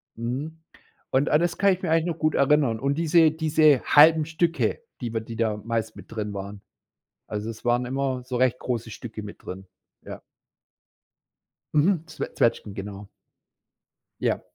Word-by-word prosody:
Mhm. 130 +8 -4 0.5
Und 135 +3 +2
an 150 - +4
das 175 0 0
kann 200 0 +4
ich 185 - -6
mich 175 - -2
eigentlich 165 +1 +2
noch 165 -1 -3
gut 155 -1 +1
erinnern. 140 -5 +3
Und 140 +3 0
diese 165 -1 +4
diese 155 -3 +3
halben 155 +1 +6
Stücke, 165 - 0 0.2
die 120 -2 -3
man 110 -1 -3
die 115 - -7
da 110 -2 +1
meist 110 0 -3
mit - - -13
drin 105 -2 -4
waren. 100 +1 -7 0.7
Also, 105 +2 -4
es 115 - -9
waren 120 +1 +2
immer 130 0 -2
so 125 -1 -5
recht 125 0 +2
große 115 -3 -3
Stücke 110 -1 -8
mit 105 - -10
drin. 95 +1 -8 0.4
Ja. - - -8 1.5
Mhm. 160 +2 +3
Zwe 160 - -6
Zwetschgen, 110 -3 0
genau. 100 0 -7 1.1
Ja. - - 0
130 Hz, 165 wpm, -25 LUFS, 110-155 Hz, 1.5 s, halben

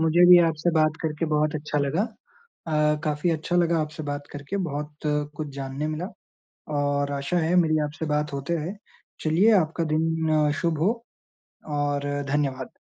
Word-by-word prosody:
मुझे 160 +2 +5
भी 180 - +10
आपसे 160 +2 0
बात 155 0 +3
करके 155 +1 -1
बहुत 150 0 +1
अच्छा 150 0 -2
लगा। 145 +7 +1 0.6
अ, 150 -1 +2
काफ़ी 150 +3 0
अच्छा 165 +2 -1
लगा 170 -1 +3
आपसे 155 +1 -4
बात 145 0 -5
करके। 145 +7 -5
बहुत 150 0 -5 0.4
कुछ 150 -1 -4
जानने 135 +2 -3
मिला, 155 +4 -3 0.7
और 145 0 0
आशा 140 +5 -1
है 165 +2 +1
मेरी 155 -1 +2
आपसे 150 +2 -5
बात 150 -1 -1
होते 140 +5 -2
रहे 170 +4 -3 0.5
चलिए 175 +8 +4
आपका 165 0 0
दिन 160 -1 +2
शुभ 170 -3 +1
हो 190 +7 +3 0.8
और, 145 -1 -1 0.3
धन्यवाद। 135 -3 -1
155 Hz, 160 wpm, -25 LUFS, 145-165 Hz, 0.8 s, भी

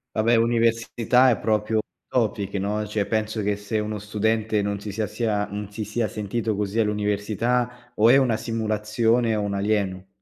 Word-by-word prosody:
Vabbè 115 +2 +3
università, 115 +2 +3
è 115 - +1
proprio 110 0 0
un - - +4 0.3
topic, 105 -4 -1
no, 105 +2 -1
cioè 105 -1 -1
penso 110 0 -1
che 100 0 0
se 105 +2 -3
uno 105 0 -3
studente 105 +1 0
non 100 0 -2
si 105 - -6
sia 105 +2 -2
sia 105 -2 -1
non 105 0 -5
si 105 +1 -5
sia 110 +2 -1
sentito 110 0 -2
così 105 +2 -1
all'università 115 +4 -1
o 110 +2 +5
è 125 - +7
una 125 -5 +3
simulazione, 115 +1 0
o 105 - -1
un 100 -1 -2
alieno. 100 -2 -1
110 Hz, 175 wpm, -24 LUFS, 105-115 Hz, 0.3 s, è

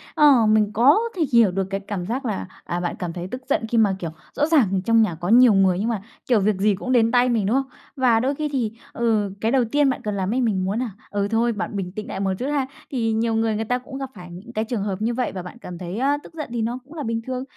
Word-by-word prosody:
ờ, 280 -6 +6
mình 215 -1 +3
có 255 - +5 0.2
thể 330 - +2
hiểu 230 -5 +6
được 190 +1 -1
cái 195 0 -2
cảm 195 -2 -5
giác 250 +7 -3
là, 210 -6 -3 0.2
à, 175 - -3
bạn 175 0 -2
cảm 175 -2 -4
thấy 175 0 -5
tức 255 - -5
giận - - +1
khi 235 - 0
mà, 205 -4 +4
kiểu, 170 - -4 0.2
rõ 295 - +1
ràng 215 - +3
trong 230 0 +4
nhà 210 -7 +1
có 175 +3 -4
nhiều 240 0 +7
người, 190 -2 +3
nhưng 220 +4 0
mà, 220 -4 -2 0.3
kiểu, 240 -4 +5
việc 205 +1 +2
gì 205 +1 +2
cũng 255 +7 -4
đến 230 -2 +4
tay 250 0 +4
mình, 225 -5 +1
đúng 215 +6 +1
không? 270 0 0 0.3
Và 250 -5 +3
đôi 270 +4 0
khi 300 0 -2
thì, 235 -5 0 0.2
ừ, 215 -4 0
cái 225 - +1
đầu 260 -2 +3
tiên 290 -1 +3
bạn 260 - -2
cần 210 -1 -2
làm 195 +2 -1
ấy, 260 - +1
mình 195 -6 0
muốn 200 +4 -1
nà, 245 -4 -2 0.2
ừ, 200 0 0
thôi 230 +1 +2
bạn 210 0 -4
bình 180 -2 -3
tĩnh 210 +1 -6
nại - - -5
một 195 -1 0
chút 255 - -2
ha. 285 -3 0 0.2
Thì 225 -4 0
nhiều 225 0 0
người 225 -1 +1
người 220 - -2
ta 245 +3 0
cũng 270 +2 -9
gặp 270 - -4
phải 180 -2 -11
những 195 +8 -11
cái 220 0 -1
trường 225 -3 -2
hợp 195 -1 -3
như 230 +2 0
vậy, 250 +1 -1
và 185 -2 -6
bạn 180 - -10
cảm 180 -7 -8
thấy, 180 +4 -5
a, 280 +2 +2
tức - - -14
giận 305 -2 -5
thì 235 - -1
nó 235 +3 -2
cũng 295 - -14
là 310 -3 -5
bình 230 -1 -2
thường. 255 0 -3
225 Hz, 300 wpm, -23 LUFS, 195-250 Hz, 0.3 s, nhiều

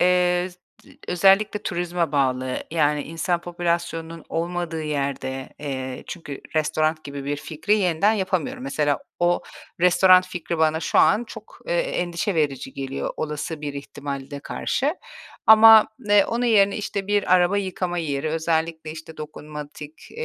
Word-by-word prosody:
eee, 180 0 +3 0.6
özellikle 195 +3 +3
turizme 175 -3 -2
bağlı, 130 -2 0
yani, 150 -2 +1
insan 165 +2 -2
popülasyonunun 170 -1 -3
olmadığı 170 -1 -3
yerde, 140 -3 -3
eee, 130 -3 -5
çünkü 145 -5 -7 0.2
restoran 155 +1 0
gibi 140 -1 -7
bir 145 +1 -2
fikri 155 +8 -1
yeniden 185 +2 +2
yapamıyorum. 210 +6 -2
Mesela, 150 - 0 0.2
o 175 0 +2 0.4
restoran 185 +1 +6
fikri 175 -2 -4
bana 160 0 +2
şu - - +1
an 230 +3 +4
çok, - - -12
eee, - - -1
endişe 180 - -2
verici 140 -4 -1
geliyor 135 0 -4
olası 150 0 -4
bir 145 -1 -5
ihtimalde 140 0 -6
karşı. 290 - -1 0.5
Ama, 220 0 +9 0.2
eee, 205 -1 +6
onun 240 +1 -1
yerine, 200 -4 +4
işte, 200 -2 -4
bir 205 -3 +2
araba 180 +3 +3
yıkama 180 -2 -3
yeri, 150 -2 -2
özellikle, 160 0 -1
işte, 160 0 -9
eee, - - -24
dokunmatik, 150 0 -10
165 Hz, 135 wpm, -23 LUFS, 150-185 Hz, 0.6 s, Ama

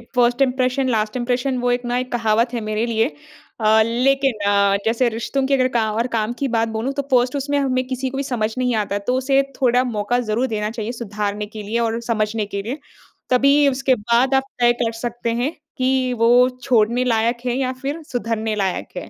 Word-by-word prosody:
First 245 +1 +2
impression 260 0 +1
last 215 0 0
impression 250 +2 -1
वो 245 0 0
एक 245 0 -1
ना 240 0 -1
एक 255 0 -3
कहावत 230 0 +1
है 235 - -2
मेरे 215 +1 -1
लिए। 225 0 +1 0.5
अ, 220 0 +4
लेकिन 270 +3 +2 0.2
अ, 200 0 +3
जैसे 235 +2 +2
रिश्तों 235 +4 -2
की 275 - +1
अगर 255 -2 +3
का 220 -1 +1
और 230 +3 -1
काम 220 +2 -1
की 280 - 0
बात 225 0 +1
बोलूँ 250 +5 -2
तो 280 - -1
फ़र्स्ट 250 +1 +3
उसमें 285 +1 -1
हमें 255 -2 0
किसी 260 0 -3
को 270 - -6
भी 275 - -1
समझ 225 -5 -2
नहीं 250 -2 +1
आता 205 -2 -1
तो - - +1
उसे 270 +1 +2 0.2
थोड़ा 250 -1 +3
मौका 240 0 -1
ज़रूर 235 +2 -1
देना 210 0 -1
चाहिए 225 0 -4
सुधारने 210 -3 -3
के 210 0 -9
लिए 220 +3 -2
और 230 0 0
समझने 220 -2 -1
के 200 0 -4
लिए। 245 +9 -5 0.5
तभी 280 +3 +4
उसके 265 0 +1
बाद 235 +4 +1
आप 265 - +3 0.2
तय 240 0 +5
कर 225 - 0
सकते 235 -1 -2
हैं 280 - 0 0.3
कि 255 -1 +1
वो 245 +2 +5
छोड़ने 240 0 +2
लायक 235 -1 +1
है 245 -1 0
या 260 -1 0
फिर 285 +4 -3
सुधरने 225 -5 -2
लायक 190 -2 -3
है। - - -6
240 Hz, 210 wpm, -20 LUFS, 220-255 Hz, 0.5 s, तय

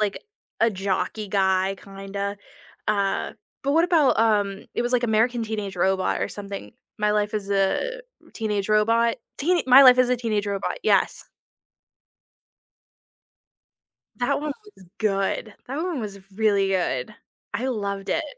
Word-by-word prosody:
like, 210 -2 -1 0.4
a 230 0 +4
jockey 195 +2 -2
guy 190 -1 +2
kinda, 200 +1 -5 0.5
uh, 200 -2 0 0.3
but 280 - +1
what 330 +2 +4
about, 330 -6 +3
um, 205 -3 +1
it - - 0
was, 240 +1 -2
like, 250 -1 +2
American 235 +1 +2
Teenage 210 -3 -4
Robot 190 +1 +1
or - - -1
something. 200 - -7 0.3
My 210 0 +2
Life 210 +1 0
as 200 -1 -3
a 200 - 0 0.3
Teenage 210 -3 -2
Robot, 230 +2 +3 0.2
Teen 345 +4 +2
My 260 +2 +9
Life 255 -1 +8
as 255 -1 +4
a 250 - +2
Teenage 215 -4 -1
Robot, 200 - -2
yes. - - +2 2.9
That 245 +2 0
one 300 0 -2 0.2
was 185 - -17
good, 200 0 -1
that 270 +3 -5
one 330 -3 -2
was 205 -3 -6
really 200 -1 +2
good. 180 -4 -1 0.4
I 255 - -1
loved 200 -5 -3
it. 330 - 0
210 Hz, 145 wpm, -24 LUFS, 195-240 Hz, 2.9 s, My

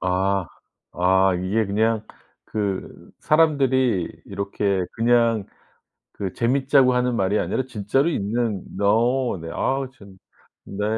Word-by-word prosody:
아. 95 0 0 0.5
아. 95 +1 +3
이게 95 +5 0
그냥 110 +2 0 0.4
그 100 -3 -4
사람들이 130 - +2 0.2
이렇게 100 -1 -1
그냥 115 -2 +2 0.7
그 95 -3 -5
재밌자고 130 +1 +3
하는 125 0 +1
말이 100 +1 +1
아니라 130 - -1
진짜로 130 +5 0
있는 110 - -1 0.2
어우 115 +3 +2
네. 80 0 -7
아우 135 -1 -1
참 100 -6 -16 0.5
네. 105 +1 -4
110 Hz, 220 characters per minute, -23 LUFS, 100-125 Hz, 0.7 s, 아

